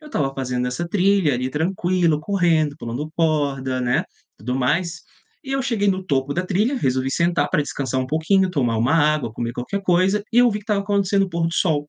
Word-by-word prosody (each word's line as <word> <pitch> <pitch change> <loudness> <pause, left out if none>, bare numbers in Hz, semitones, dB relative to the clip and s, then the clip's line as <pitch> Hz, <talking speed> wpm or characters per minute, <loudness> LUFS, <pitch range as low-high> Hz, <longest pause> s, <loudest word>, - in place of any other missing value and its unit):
Eu 305 - -12
estava 135 - -1
fazendo 125 -2 -2
essa 170 +8 -3
trilha 190 -4 +2
ali, 130 +1 -2
tranquilo, 170 +1 0
correndo, 165 -6 +1
pulando 125 +7 -5
corda, 140 -5 0
né, 125 0 +1 0.3
tudo 125 +5 -4
mais. 165 +7 0 0.4
E 270 - -6
eu 270 -1 0
cheguei 220 -6 0
no 190 -1 0
topo 140 -2 -1
da 180 +1 -1
trilha, 210 +9 0
resolvi 130 - 0
sentar 170 +2 +1
pra 155 -5 +1
descansar 130 -2 -2
pouquinho, 185 +6 +1
tomar 125 -9 0
uma 120 +7 +1
água, 150 -7 +2
comer 120 0 -4
qualquer 125 +12 -4
coisa, 185 +3 +2
e - - -1
eu 245 0 +6
vi 210 - -2
que 205 - -15
estava 210 -2 0
acontecendo 200 -1 +1
o - - -6
pôr 165 0 0
do 165 - -3
sol. 150 -5 0
160 Hz, 205 wpm, -21 LUFS, 135-190 Hz, 0.4 s, eu